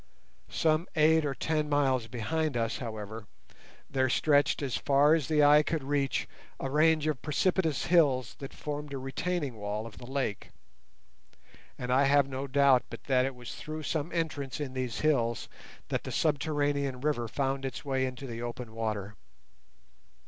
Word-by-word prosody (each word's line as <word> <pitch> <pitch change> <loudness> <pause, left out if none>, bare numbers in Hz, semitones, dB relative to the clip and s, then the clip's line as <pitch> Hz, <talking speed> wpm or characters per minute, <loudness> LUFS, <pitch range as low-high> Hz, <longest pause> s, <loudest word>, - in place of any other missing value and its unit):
Some 160 +2 +1
eight 160 0 +5
or 140 -2 -2
ten 155 0 -1
miles 135 -5 +2
behind 140 +5 -1
us, 115 -1 -1
however, 110 -2 -6 0.6
there 130 -1 +1
stretched 145 +2 +3
as 130 -3 -1
far 145 +2 +4
as 160 -5 +1
the 150 -2 +3
eye 145 +1 +7
could 155 -1 -2
reach 140 0 0 0.3
a 135 - -3
range 155 +1 +4
of 150 -6 -1
precipitous 160 -1 +1
hills 140 -9 +3
that 135 - -7
formed 150 -1 -5
a - - -2
retaining 135 0 -3
wall 105 +1 -3
of 115 - -10
the 120 - -10
lake, 130 -6 -3 1.3
and 125 0 -2
I 135 +2 +4
have 140 0 +4
no 135 +1 -4
doubt 140 -2 +5
but 115 - -9
that 130 -2 +2
it 135 - -5
was 125 -1 -8
through 155 0 -6
some 155 +1 -2
entrance 150 -6 -2
in 140 -3 -4
these 130 -3 -3
hills 120 -7 +1 0.4
that - - -1
the - - -5
subterranean 145 -3 0
river 140 -5 0
found 135 +3 -1
its 135 0 -5
way 130 -1 0
into 130 +2 -7
the 115 -2 -6
open 120 -1 -6
water. 105 -3 -3
135 Hz, 165 wpm, -30 LUFS, 125-150 Hz, 1.3 s, eye